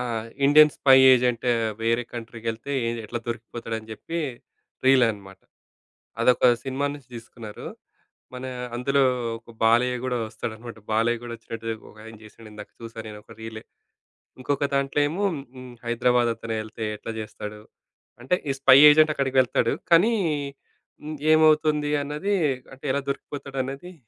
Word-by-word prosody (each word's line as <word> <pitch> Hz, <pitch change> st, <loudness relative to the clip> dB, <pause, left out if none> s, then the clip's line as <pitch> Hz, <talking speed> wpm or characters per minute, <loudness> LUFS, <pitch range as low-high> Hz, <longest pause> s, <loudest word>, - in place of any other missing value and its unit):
ఆ! -, -, -1 dB, 0.4 s
"Indian 150 Hz, +1 st, +7 dB
spy 135 Hz, -1 st, +5 dB, 0.2 s
agent 125 Hz, -1 st, +2 dB, 0.3 s
వేరే 115 Hz, +1 st, +1 dB
కంట్రీకెళ్తే 115 Hz, +2 st, -5 dB
ఏది 115 Hz, 0 st, -2 dB
ఎట్లా 120 Hz, +3 st, -4 dB
దొరికిపోతాడు?" 115 Hz, 0 st, -5 dB
అని 110 Hz, 0 st, -14 dB
చెప్పి 165 Hz, +10 st, -6 dB, 0.7 s
రీల్ 130 Hz, -2 st, +6 dB
అన్నమాట. 100 Hz, -3 st, -7 dB, 0.8 s
అదొక 125 Hz, +1 st, +4 dB, 0.2 s
సినిమా 135 Hz, +1 st, -2 dB
నుంచి 140 Hz, -3 st, -14 dB
తీసుకున్నారు. 115 Hz, -2 st, -10 dB, 0.7 s
మన 125 Hz, +1 st, -7 dB, 0.3 s
అందులో 140 Hz, +3 st, +1 dB, 0.4 s
ఒక 115 Hz, +1 st, -16 dB
బాలయ్య 120 Hz, +3 st, +3 dB
గూడా 125 Hz, -1 st, -1 dB
ఓస్తాడన్నమాట. 110 Hz, +1 st, -7 dB
బాలయ్య 115 Hz, +2 st, +1 dB
కూడా 120 Hz, -1 st, -7 dB
వచ్చినట్టు 115 Hz, 0 st, -8 dB, 0.2 s
ఒకాయన 110 Hz, +1 st, -12 dB
చేసాడు, 110 Hz, +1 st, -15 dB
ఇందాక 105 Hz, -1 st, -10 dB
చూసా 115 Hz, 0 st, -9 dB
నేనొక 105 Hz, 0 st, -12 dB
రీలే. 110 Hz, -1 st, -8 dB, 0.8 s
ఇంకొక 145 Hz, +2 st, 0 dB
దాంట్లో 140 Hz, +1 st, 0 dB
ఏమో 185 Hz, +6 st, -3 dB
హ్మ్, 130 Hz, -3 st, -10 dB
'హైదరాబాద్' 120 Hz, 0 st, +2 dB
అతనే 115 Hz, 0 st, -4 dB
ఎళ్తే 110 Hz, +1 st, -8 dB
ఎట్లా 115 Hz, -, -7 dB
చేస్తాడు? 105 Hz, 0 st, -8 dB, 0.6 s
అంటే 135 Hz, +8 st, +2 dB, 0.2 s
ఈ -, -, 0 dB
స్పై 130 Hz, -1 st, +8 dB
ఏజెంట్ 155 Hz, +1 st, +5 dB
అక్కడికి 135 Hz, -2 st, -1 dB
వెళ్తాడు, 120 Hz, -2 st, 0 dB, 0.2 s
కానీ 195 Hz, +8 st, +5 dB, 0.9 s
హ్మ్, 155 Hz, +1 st, -5 dB, 0.2 s
ఏమవుతుంది 155 Hz, -1 st, +3 dB
అన్నది, 150 Hz, +8 st, -2 dB, 0.4 s
అంటే 135 Hz, -, -14 dB
ఎలా 140 Hz, -, 0 dB
దొరికిపోతాడు 140 Hz, -1 st, -7 dB
అనేది 140 Hz, +7 st, -8 dB
120 Hz, 135 wpm, -24 LUFS, 115-140 Hz, 0.9 s, స్పై